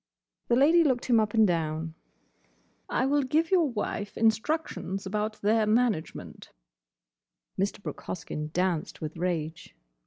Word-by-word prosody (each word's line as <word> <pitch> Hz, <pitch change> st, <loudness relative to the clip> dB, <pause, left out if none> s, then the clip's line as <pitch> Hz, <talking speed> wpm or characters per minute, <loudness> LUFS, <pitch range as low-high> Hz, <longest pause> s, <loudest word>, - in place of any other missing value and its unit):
The 235 Hz, -, +3 dB
Lady 320 Hz, +6 st, +5 dB
looked 260 Hz, -5 st, +1 dB
him 235 Hz, -3 st, +4 dB
up 215 Hz, 0 st, 0 dB
and 220 Hz, -1 st, +6 dB
down. 160 Hz, -2 st, -1 dB, 1.0 s
"I -, -, +1 dB
will 290 Hz, +2 st, +2 dB
give 310 Hz, +6 st, 0 dB
your 345 Hz, -6 st, +4 dB
wife 210 Hz, -3 st, -4 dB
instructions 220 Hz, -, 0 dB
about 210 Hz, +2 st, -2 dB
their 215 Hz, +1 st, +3 dB
management—" 220 Hz, -6 st, -1 dB, 1.1 s
Mr. 200 Hz, +1 st, -2 dB
Brooke -, -, -6 dB
Hoskyn 150 Hz, -3 st, -5 dB
danced 180 Hz, -2 st, -1 dB
with 155 Hz, 0 st, -5 dB
rage. 165 Hz, -2 st, -3 dB
215 Hz, 130 wpm, -28 LUFS, 175-250 Hz, 1.1 s, and